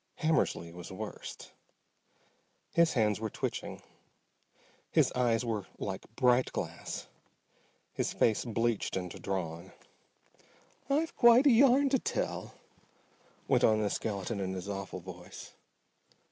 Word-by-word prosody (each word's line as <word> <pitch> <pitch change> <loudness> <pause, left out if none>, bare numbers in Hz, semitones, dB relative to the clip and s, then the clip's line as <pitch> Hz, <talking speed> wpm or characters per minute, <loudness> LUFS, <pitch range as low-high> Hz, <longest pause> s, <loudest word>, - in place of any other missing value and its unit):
Hammersly 155 - +1
was 90 0 -9
worst. 105 +3 -7 1.2
His 170 -1 +4
hands 105 -4 +2
were 110 0 -2
twitching, - - -4 1.1
his - - +3
eyes 120 -1 +1
were 110 -4 -2
like 95 -1 -5
bright 125 0 +3
glass, - - -5 0.9
his - - -1
face 110 -2 +2
bleached 115 -3 -1
and 90 -2 -4
drawn. 85 -4 -4 1.2
"I've 310 +4 +1
quite 240 +3 +7
a 285 - +7
yarn 270 +3 +5
to 265 -1 +2
tell," - - -3 0.9
went - - +3
on 110 -1 +5
the 105 - 0
skeleton 100 0 -3
in 95 -1 -2
his 95 +1 -5
awful 95 -2 -5
voice. 90 0 -10
110 Hz, 120 wpm, -31 LUFS, 95-140 Hz, 1.2 s, quite